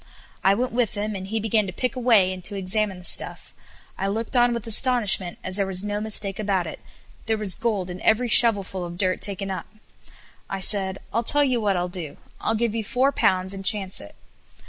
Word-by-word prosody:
I 195 +1 +4
went 250 +4 -2
with 235 -2 0
him, 210 +1 -3
and 190 0 -6
he 220 +3 -2
began 215 -1 +1
to - - -5
pick 250 +8 -3
away, 225 -7 +3
and 185 -1 -10
to 205 - -1
examine 195 +1 -1
the 180 - -12
stuff. - - -3 0.5
I 195 - -1
looked 220 +5 -3
on 240 0 +4
with 235 -2 -4
astonishment, 225 -6 +2
as 185 +1 -1
there 200 - +1
was 190 0 +1
no 205 0 -3
mistake 205 -2 +1
about 195 -4 0
it 160 - -8 0.5
there 220 0 +1
was 210 -3 +3
gold 210 -5 -1
in 180 - -8
every 230 +3 +2
shovel 225 -3 +5
full 185 -1 -6
of 175 0 -7
dirt 185 -1 +1
taken 195 -1 0
up. 190 - -6 0.8
I 195 - -4
said: 190 -1 -1 0.2
"I'll 230 - +2
tell 290 +5 +3
you 255 -4 +1
what 200 -3 +1
I - - 0
will 180 - -2
do; 175 -5 -8 0.2
I'll 225 - -1
give 230 -1 -1
you 225 -1 -2
four 255 +6 +1
pounds, 185 -6 +1
and 195 0 -7
chance 195 -2 +5
it." 100 - -13
205 Hz, 225 wpm, -23 LUFS, 190-225 Hz, 0.8 s, shovel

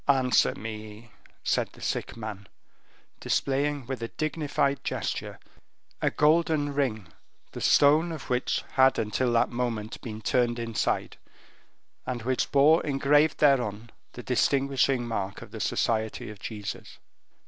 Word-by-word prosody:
"Answer 130 -3 +3
me," 110 0 -8 0.3
said - - 0
the - - -16
sick - - -3
man, 105 -3 -7 0.7
displaying 140 0 0
with 130 -1 -5
a 115 - -2
dignified 145 -1 -1
gesture - - -3 0.6
a - - +3
golden 150 -1 +2
ring, 110 -10 -1 0.4
the - - -7
stone 155 +4 +4
of 155 -4 -7
which 125 0 0
had 130 0 +4
until 120 +3 0
that 115 - +2
moment 120 -3 -3
been 110 -2 -6
turned 120 +1 +1
inside, 115 -2 -2 0.9
and 125 -3 -4
which 130 +1 -1
bore 150 +4 +5
engraved 145 +2 +3
thereon 120 -6 +2 0.2
the 125 - -8
distinguishing 135 -1 +1
mark 100 -4 -4
of - - -14
the - - -7
Society 110 -1 -1
of 105 - -12
Jesus. 105 -3 -7
125 Hz, 130 wpm, -27 LUFS, 110-140 Hz, 0.9 s, bore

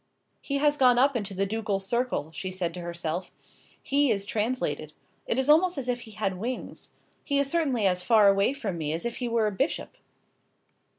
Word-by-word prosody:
"He 280 - -2
has 295 +1 +2
gone 250 -3 +5
up 270 +2 +4
into 200 -4 -3
the 195 +1 +1
ducal 210 -1 -1
circle," 225 - -1
she 185 +3 -5
said 185 -2 -3
to 180 - -7
herself. 170 +1 -4 0.5
"He 280 0 +2
is 200 -3 0
translated. 210 - -2 0.3
It 230 - 0
is 265 0 +1
almost 330 +3 +4
as 265 -2 -4
if 245 -1 0
he 230 -2 -11
had 195 -3 -2
wings. 245 +5 -5 0.3
He 285 - 0
is 280 0 +1
certainly 275 -10 +1
as 180 -1 +2
far 215 +1 +5
away 200 +5 +3
from 205 -11 -4
me 155 -1 -2
as 165 +7 -4
if 235 - -3
he 245 - -2
were 230 -2 +1
a 210 - +1
bishop." 270 - -2
220 Hz, 200 wpm, -27 LUFS, 190-260 Hz, 0.5 s, gone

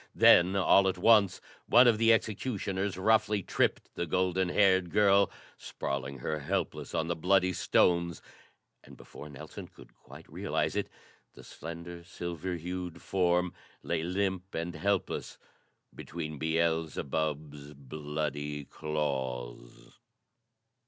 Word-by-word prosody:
Then, 90 +2 +6
all 95 0 +5
at 95 - 0
once, 100 -1 +4 0.3
one 125 +1 +7
of 110 -2 +4
the 115 0 +5
executioners 100 -4 -1
roughly 105 0 +2
tripped - - -1
the 85 - -3
golden 90 +2 +1
haired 95 -2 +3
girl, 100 0 +4 0.3
sprawling 70 0 -5
her 75 +5 -3
helpless 90 +7 -3
on 80 - 0
the 85 - -1
bloody 95 +2 +2
stones; 85 -1 +2 0.6
and, - - -15
before 75 - -11
Nelson 70 -2 -9
could - - -17
quite - - -15
realize - - -2
it, - - -1 0.5
the - - -13
slender, 85 +2 -9
silver 85 0 -5
hued 90 0 -5
form 90 -1 +1 0.3
lay - - -1
limp 95 +2 -2
and 85 +1 -3
helpless 100 +4 -2 0.6
between 75 -3 -7
Beelzebub's 80 -2 -2
bloody 75 +1 -4
claws. 65 -6 -5
85 Hz, 120 wpm, -30 LUFS, 75-95 Hz, 0.6 s, one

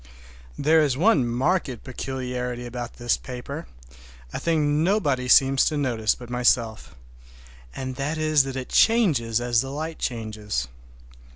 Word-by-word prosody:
There 160 +2 +4
is 140 -4 +1
one 160 - +3
marked 130 - -1
peculiarity 125 -2 -4
about 120 0 -6
this 120 -1 0
paper, 135 +5 -7 0.7
a - - -3
thing 155 -2 +1
nobody 150 -10 +1
seems 135 +1 +5
to 155 - 0
notice 120 -6 0
but 120 - -11
myself, 120 -2 0 0.8
and 130 -1 -5
that 145 +4 -2
is 155 -1 +3
that 135 -1 -5
it 130 -1 -5
changes 150 - +3
as 120 -1 +2
the 135 - -6
light 155 +3 -5
changes. 110 - -3
130 Hz, 135 wpm, -24 LUFS, 120-150 Hz, 0.8 s, seems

